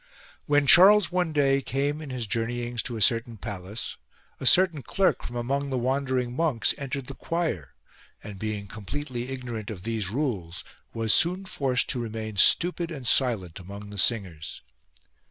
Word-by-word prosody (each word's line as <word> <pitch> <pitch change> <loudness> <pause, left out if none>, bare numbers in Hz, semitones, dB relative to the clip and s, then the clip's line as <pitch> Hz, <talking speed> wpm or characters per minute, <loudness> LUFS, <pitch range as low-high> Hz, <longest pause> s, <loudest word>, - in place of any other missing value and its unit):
When 145 0 +3
Charles 190 +3 +7
one 180 -2 0
day 140 -2 +2
came 140 +3 -2
in 150 - -8
his 125 -3 -3
journeyings 120 +2 -2
to 120 -2 -3
a 110 - +2
certain 115 0 +2
palace, 100 0 -6 0.4
a 130 - -1
certain 175 -3 +5
clerk 190 +7 +1
from 120 - -7
among 140 +4 -2
the 130 - -1
wandering 130 -1 -1
monks 150 -7 +1
entered 140 -1 -4
the 135 - -7
choir 135 - -3 0.5
and 100 -2 -9
being 105 -1 -3
com 100 +1 -10
pletely 130 -4 -4
ignorant 120 -5 -5
of 95 -5 -7
these 110 -3 -1
rules 100 - -3 0.3
was 115 -2 +1
soon 180 +3 +3
forced 130 -8 0
to 125 - -1
remain 110 -2 -5
stupid 170 - +3
and 140 -6 -7
silent 105 -11 +1
among 100 +3 -9
the 100 - -6
singers. 90 -8 -1
120 Hz, 165 wpm, -26 LUFS, 110-140 Hz, 0.5 s, Charles